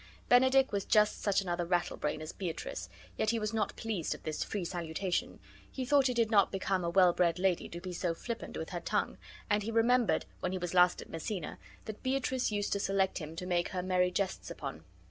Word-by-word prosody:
Benedick 260 +2 +5
was 200 -2 -1
just 210 -1 +3
such 200 -1 +2
another 175 -2 -1
rattlebrain 170 -3 -1
as 155 - -6
Beatrice, 175 -4 -5 0.3
yet 215 - +1
he 230 - +2
was 215 0 -2
not 215 -2 -1
pleased 210 -8 -2
at - - -14
this 155 -1 -2
free 200 -4 -3
salutation; 175 +1 -2 0.3
he 260 - -4
thought 275 0 +4
it 250 - -1
did 230 -1 +2
not 200 -3 +5
become 190 -1 -1
a 170 - 0
well 180 0 +5
bred 170 -1 +2
lady 185 -1 +1
to 170 - -6
be 180 0 -6
so 170 -1 -1
flippant 235 +6 -5
with - - -5
her - - -3
tongue; - - -1 0.3
and 210 0 +2
he 210 - -4
remembered, 230 +1 +3
when 180 - -2
he - - -1
was 175 -1 -4
last 180 0 +4
at - - -19
Messina, 165 +1 -4 0.3
that 215 -1 -7
Beatrice 260 -2 0
used 205 -1 -1
to 200 - 0
select 195 -1 +1
him 155 0 -7
to 180 - -5
make 175 -1 0
her 180 -1 -3
merry 180 -1 +2
jests 190 +1 -2
upon. - - -6
190 Hz, 220 wpm, -32 LUFS, 175-220 Hz, 0.3 s, Benedick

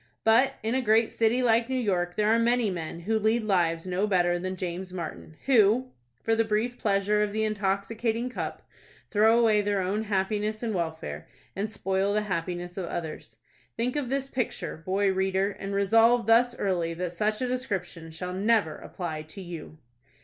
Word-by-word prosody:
But, 250 +5 +4
in 225 +2 0
a 260 - +1
great 225 -1 +3
city 230 +3 +2
like 230 0 +3
New 260 - -1
York, 180 -8 0
there 210 0 +2
are 225 +1 +4
many 235 -2 +2
men 170 -1 -5
who 220 +5 0
lead 220 +2 +2
lives 170 -5 +1
no 185 +3 0
better 175 -3 +2
than 185 +1 -3
James 180 0 -5
Martin, 165 -3 -7
who, 250 0 +4 0.3
for 225 - +2
the 225 0 +3
brief 225 +3 -1
pleasure 205 0 +2
of 210 -1 0
the 220 0 0
intoxicating 215 +3 -1
cup, 250 - -5 0.5
throw 220 +2 +5
away 220 -3 +4
their 205 -1 0
own 200 +4 -1
happiness 210 +2 -1
and 225 -2 -1
welfare, 160 - -4 0.3
and 205 +3 -2
spoil 195 -1 0
the 210 - +2
happiness 175 -1 -4
of 185 -3 -3
others. 160 -3 -6 0.4
Think 245 +3 -1
of 285 -4 -2
this 270 0 -1
picture, 255 -3 -3
boy 190 +4 0
reader, 190 +1 +1
and 195 0 -6
resolve 225 +4 +4
thus 240 +2 +4
early 170 -4 -1
that 175 0 -3
such 215 +4 0
a 255 - -1
description 195 -10 -4
shall 180 +3 -6
never 200 -4 +2
apply 160 -4 -5
to 155 +6 -10
you! 165 -3 -8
205 Hz, 180 wpm, -27 LUFS, 180-225 Hz, 0.5 s, throw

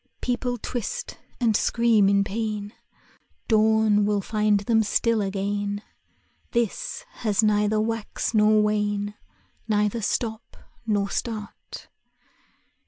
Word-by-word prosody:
People 245 0 -1
twist 245 - -5 0.2
and 230 -4 +2
scream 225 -3 +3
in 200 0 +3
pain, 210 0 -3 0.7
Dawn 220 -1 +4
will 205 0 +1
find 210 0 +1
them 225 +2 +2
still 220 +1 +1
again; 205 +1 -2 0.7
This 235 - -2
has 215 -2 +1
neither 210 0 +2
wax 225 +1 -2
nor 215 0 +4
wane, 205 -1 0 0.5
Neither 210 +1 +1
stop 220 +1 -3 0.3
nor 205 -2 0
start. 220 -4 -6
215 Hz, 105 wpm, -25 LUFS, 205-225 Hz, 0.7 s, Dawn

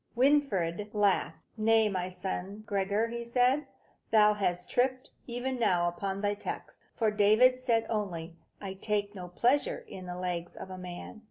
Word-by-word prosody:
Winfried 215 - +2
laughed. 205 -2 +2 0.2
"Nay, 220 0 +4
my 185 -3 -2
son 190 +2 -5
Gregor," 205 +3 0
said 250 +3 +3
he, 300 - -13 0.4
"thou 210 -1 +6
hast 180 -4 -1
tripped, 255 +1 0 0.2
even 245 +1 -3
now, 180 -6 +3
upon 190 +3 -3
thy 205 0 +1
text. 205 - -7 0.2
For 220 -2 +2
David 215 +5 +5
said 230 -3 +2
only, 175 -6 -3 0.2
'I 195 -2 -5
take 205 -1 -1
no 180 -3 -7
pleasure 285 - +1
in 185 - -9
the 180 0 -5
legs 175 -1 -3
of 190 - -8
a 185 - -6
man.' 180 +4 -8
210 Hz, 160 wpm, -30 LUFS, 185-235 Hz, 0.4 s, thou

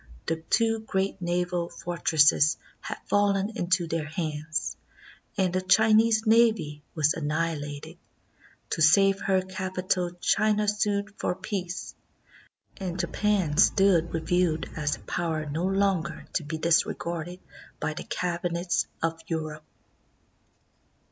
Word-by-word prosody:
The 165 - -1
two 225 +7 +1
great 195 -3 -2
naval 175 0 -1
fort 175 -1 -7
resses 150 -1 +5 0.2
had - - -6
fallen 205 +1 +1
into 175 -3 +1
their 165 -2 -3
hands, 155 0 -3 0.6
and 185 -3 +1
the 185 - +1
Chinese 220 +3 +4
navy 220 -10 +3
was 155 -1 +3
annihilated. 150 -2 -3 0.7
To - - -1
save 195 +5 +5
her 190 -1 +1
capital 185 -1 -2
China 210 +2 +2
sued 205 0 0
for - - -1
peace, 185 -3 -5 0.8
and 185 -2 -4
Japan 185 -3 0
stood 185 -3 +4
revealed 165 0 0
as 150 -2 -1
a - - -16
power 160 -3 -2
no 155 +4 -2
longer 195 -3 0
to - - 0
be 155 +2 -4
disregarded 170 +1 0 0.4
by - - -2
the - - -6
cabinets 175 0 -1 0.2
of 165 0 -1
Europe. 155 -2 -4
175 Hz, 120 wpm, -27 LUFS, 160-195 Hz, 0.8 s, resses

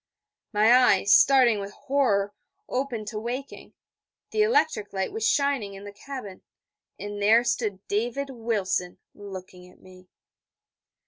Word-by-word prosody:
_' - - -67 0.5
My 215 +2 +4
eyes, 205 -6 +4
starting 250 -6 +5
with 200 +1 -7
horror, 205 -8 0 0.3
opened 250 -4 -3
to 215 - -5
waking; 250 +5 -7 0.6
the 430 - +1
electric 425 - +1
light 190 -1 -2
was 445 +1 -1
shining 280 - 0
in 195 - -10
the 205 0 -9
cabin; 210 -4 -9 0.6
and 205 0 -6
there 220 +4 +5
stood 220 -5 -2
David 245 +6 -2
Wilson 205 -7 -2 0.2
looking 185 -2 -10
at 180 - -21
me. 185 0 -17
215 Hz, 135 wpm, -25 LUFS, 200-260 Hz, 0.6 s, starting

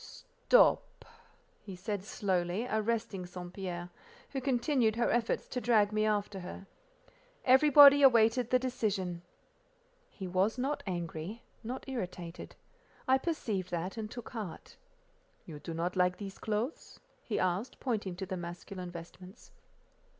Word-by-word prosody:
"Stop!" - - +4 0.6
he 195 -3 -8
said 200 +1 -4
slowly, 190 0 -1
arresting 220 -4 -1
St. 180 0 -8
Pierre, 180 -2 -5 0.4
who 270 - -3
continued 250 -3 +2
her 235 +1 +1
efforts 240 -1 0
to 250 - -3
drag 215 -4 +3
me 215 0 +1
after 205 -2 -1
her. 180 +2 -8 0.8
Everybody 285 +2 +8
awaited 235 -2 +5
the 255 - +5
decision. 205 -9 -2 0.9
He 195 - -8
was 190 +6 +1
not 270 +4 -1
angry, 175 +4 -4 0.2
not 250 +5 -6
irritated; 180 -9 -6 0.5
I 260 +1 +5
perceived 220 - -2
that, 175 +2 -3
and 220 -2 -5
took 240 0 -8
heart. 210 -9 -7 0.7
"You 150 -2 -9
do 165 - -7
not 170 +3 -2
like 180 0 +2
these 195 -2 -8
clothes?" 220 +7 -3 0.2
he 215 - -3
asked, 185 +8 -1
pointing 210 -8 -2
to 190 +2 -5
the 190 0 -4
masculine 175 +1 -7
vestments. 180 +4 -11
210 Hz, 135 wpm, -32 LUFS, 180-240 Hz, 0.9 s, Everybody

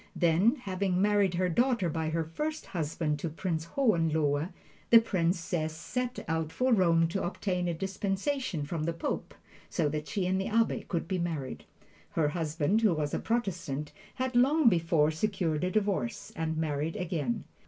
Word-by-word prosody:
Then, 175 - +4
having 190 -3 -1
married 200 -2 +3
her 180 +1 +2
daughter 235 +2 +2
by 160 0 -1
her 165 +1 0
first 300 - -4
husband 155 -3 -2
to 165 - -2
Prince 160 0 -2
Hohenlohe, 160 - +2 0.4
the 230 - +10
Princess 170 -5 -1
set 250 +9 -4
out 160 -1 -1
for 255 +5 +2
Rome 165 -5 +4
to 195 +3 -2
obtain 180 0 -1
a 170 - -1
dispensation 195 - -2
from 155 +1 -3
the 170 - 0
Pope, 165 - -4 0.3
so 145 - 0
she 190 +4 -2
and 190 +1 +1
the - - -2
Abbe 225 +1 +1
could 170 -2 -2
be 185 0 -1
married. 155 -7 -3 0.5
Her 155 -3 +2
husband, 160 +5 0
who 210 -7 +4
was 150 -1 -2
a - - 0
Protestant, 165 - -2 0.2
had 255 -1 -2
long 270 +2 +5
before 165 -4 +2
secured 165 -2 -1
a 180 - +1
divorce 200 - -1
and 160 -1 -2
married 155 0 -1
again. 160 -9 -2
175 Hz, 165 wpm, -30 LUFS, 160-200 Hz, 0.5 s, the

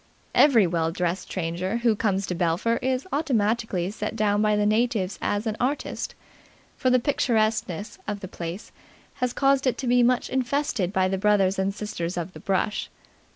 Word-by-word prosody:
Every 245 -9 +6
well 165 -1 0
dressed 180 +2 -2
stranger 185 +4 -2
who 235 -2 +2
comes 200 -3 0
to 180 - -3
Belpher 180 +7 +1
is 255 +2 -1
automatically 225 - 0
set 215 +1 -4
down 205 -1 +2
by 210 0 +3
the 210 0 +1
natives 215 -3 +1
as 205 +2 -1
an 220 -2 -1
artist, 270 +4 -2 0.6
for 255 - +1
the 255 - +5
picturesqueness 220 - 0
of 205 -1 -3
the 190 - -6
place 175 +3 -7 0.5
has 250 -2 0
caused 275 0 +2
it 255 - +1
to 270 - -4
be 245 0 +4
much 245 +1 +2
infested 260 - -1
by 190 -2 +2
the 190 0 -1
brothers 195 -2 +3
and 190 +1 +1
sisters 185 -4 -4
of 175 +2 -4
the - - -10
brush. 195 +2 -1
210 Hz, 175 wpm, -25 LUFS, 185-245 Hz, 0.6 s, Every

